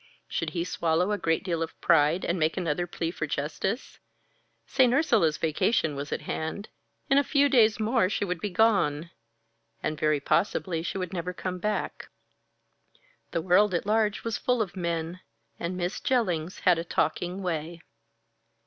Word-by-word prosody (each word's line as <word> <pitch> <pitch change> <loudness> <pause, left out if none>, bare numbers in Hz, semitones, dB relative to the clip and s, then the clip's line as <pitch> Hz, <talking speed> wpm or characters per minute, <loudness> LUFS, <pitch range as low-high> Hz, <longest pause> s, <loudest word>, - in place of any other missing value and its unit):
Should - - -2
he 170 - +1
swallow 170 +2 0
a 210 - +1
great 165 0 0
deal 170 -4 -2
of 165 - -5
pride, 160 +2 +3
and 170 +1 0
make 155 +2 +1
another 175 -1 -1
plea 165 -1 -3
for 155 - -4
justice? 160 - -3 0.7
St. 255 -3 +3
Ursula's 230 - +3
vacation 160 0 +1
was 140 +1 -5
at - - -2
hand; 160 +6 -4 0.4
in 275 - +5
a - - +2
few 285 0 +3
days 225 -6 +4
more 220 -3 +2
she 205 - -1
would 180 -3 -3
be 210 - -1
gone 175 -7 +2 0.7
and 155 -1 -2
very 155 -1 +2
possibly 170 +2 0
she 170 - -4
would 185 -1 -4
never 180 0 -3
come 180 0 -4
back. 210 +3 -3 1.2
The 165 - -2
world 185 +1 +4
at 170 - -1
large 210 0 +1
was 230 -1 -2
full 250 -1 +1
of 200 -4 -2
men, 170 -1 -3 0.4
and 175 +2 -3
Miss 180 +2 -2
Jellings 185 - 0
had 175 -2 +4
a - - -2
taking 175 +3 -1
way. 165 -1 -3
180 Hz, 165 wpm, -27 LUFS, 165-210 Hz, 1.2 s, in